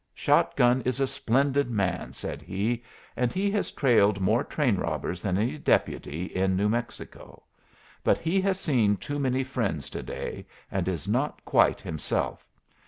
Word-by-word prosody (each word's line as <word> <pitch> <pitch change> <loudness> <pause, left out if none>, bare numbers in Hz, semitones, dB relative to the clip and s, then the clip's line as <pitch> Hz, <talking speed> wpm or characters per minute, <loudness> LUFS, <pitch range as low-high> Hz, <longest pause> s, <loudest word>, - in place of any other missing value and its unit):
"Shot - - +2
gun 125 +1 +4
is 130 +2 -1
a 135 - +3
splendid 135 +2 +1
man," 100 -5 -1
said - - -6
he, 110 +5 -2 0.3
"and 125 -1 0
he 200 +2 0
has 205 0 -1
trailed 105 -7 +3
more 110 +7 +2
train 130 -10 +1
robbers 85 +1 -3
than 95 -1 0
any 125 +9 -1
deputy 80 - 0
in 95 +1 0
New 100 +2 +2
Mexico. 115 +2 -5 0.6
But - - +3
he 180 +4 0
has 190 -1 +1
seen 115 - +2
too 145 +6 -4
many 130 -1 +1
friends 130 0 -3
to - - -5
day, - - -6 0.2
and 95 -2 -1
is 95 -1 -2
not 130 +8 -1
quite - - +3
himself. 80 -1 -3
120 Hz, 165 wpm, -27 LUFS, 95-140 Hz, 0.6 s, gun